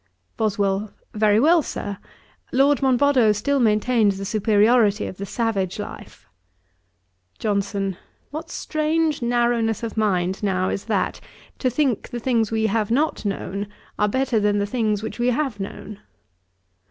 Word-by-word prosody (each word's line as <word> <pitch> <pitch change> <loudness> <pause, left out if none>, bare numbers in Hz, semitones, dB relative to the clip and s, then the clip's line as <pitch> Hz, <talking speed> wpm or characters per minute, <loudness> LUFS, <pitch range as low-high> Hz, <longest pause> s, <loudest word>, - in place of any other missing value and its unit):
BOSWELL. 205 -1 0 0.2
'Very 210 0 +3
well, 325 +6 +5
Sir. 200 -7 -5 0.5
Lord 280 +2 +3
Monboddo 260 -3 +4
still 275 +7 0
maintains 215 -2 +2
the 195 - -5
superiority 215 +1 +3
of 185 - -7
the 200 - -5
savage 200 -5 -1
life.' - - -9 1.1
JOHNSON. 200 -2 -1 0.3
'What 320 +3 -6
strange 310 -1 -1
narrowness 235 -2 +1
of 230 -1 -5
mind 190 -3 0
now 185 -2 0
is 195 - -3
that, 210 -4 -1 0.4
to 255 - +1
think 250 -3 0
the 240 - -5
things 230 -3 +1
we 220 0 0
have 220 0 0
not 280 +1 0
known, 200 0 -3 0.3
are 210 - +3
better 260 +1 +1
than 205 0 +2
the 200 - +1
things 215 -2 -1
which 220 - -6
we 240 - +1
have 250 -3 0
known.' 200 +1 -7
220 Hz, 140 wpm, -22 LUFS, 205-250 Hz, 1.1 s, well